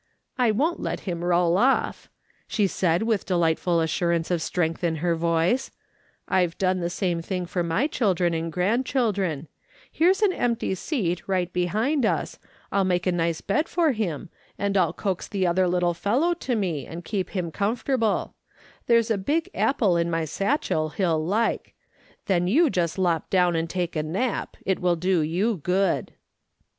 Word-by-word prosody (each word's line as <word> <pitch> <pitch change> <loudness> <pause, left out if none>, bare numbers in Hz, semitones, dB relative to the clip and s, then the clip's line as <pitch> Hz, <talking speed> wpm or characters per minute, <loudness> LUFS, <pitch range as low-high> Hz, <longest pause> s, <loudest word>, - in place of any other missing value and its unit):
" - - -50
I - - +4
won't 295 +11 +1
let - - -3
him 175 -3 -4
roll 175 0 +2
off," 265 +4 +1 0.4
she 210 - +1
said, 180 -1 +1
with 220 -4 0
delightful 170 -1 +1
assurance 165 +1 0
of 175 -2 +1
strength 165 0 -1
in 165 -2 +1
her 170 +2 0
voice; 170 +9 +1 0.3
" - - -36 0.3
I've 180 -2 +1
done 185 -1 +1
the 170 -1 -1
same 175 -2 -1
thing 180 +1 -3
for 175 +1 -2
my 170 +10 +1
children 185 - +1
and 165 0 -2
grandchildren; 195 - 0 0.4
here's 375 +6 +3
an 390 -3 +4
empty 235 - -1
seat 185 - -2
right 180 -2 -1
behind 215 - 0
us, 220 - -1 0.3
I'll 200 - +2
make 180 -1 0
a 185 - +2
nice 170 -2 -1
bed 300 +11 0
for 335 -4 +2
him, 195 - -3 0.3
and 200 0 -1
I'll 180 -4 +3
coax 190 -4 -3
the 195 -2 -1
other 180 +1 +2
little 175 -1 +1
fellow 250 - +1
to 265 -7 -2
me, 170 - -2
and 170 +1 -8
keep 195 -4 -2
him 175 -3 -2
comfortable; 225 - 0 0.5
there's 230 -1 +3
a 210 - +1
big 305 +12 -1
apple 215 -10 +2
in 170 0 0
my 165 -1 0
satchell 160 - -1
he'll 165 -5 +1
like: 210 +7 -1 0.5
then 180 -3 +1
you 295 - +4
just 170 -1 -1
lop 175 -4 0
down 180 -2 +3
and 165 0 -1
take 175 -1 -2
a 155 - +1
nap; 190 +11 -2
it 190 - 0
will 180 -1 +2
do 180 +1 +1
you 185 +8 0
good." 180 +3 0
180 Hz, 175 wpm, -25 LUFS, 170-220 Hz, 0.5 s, I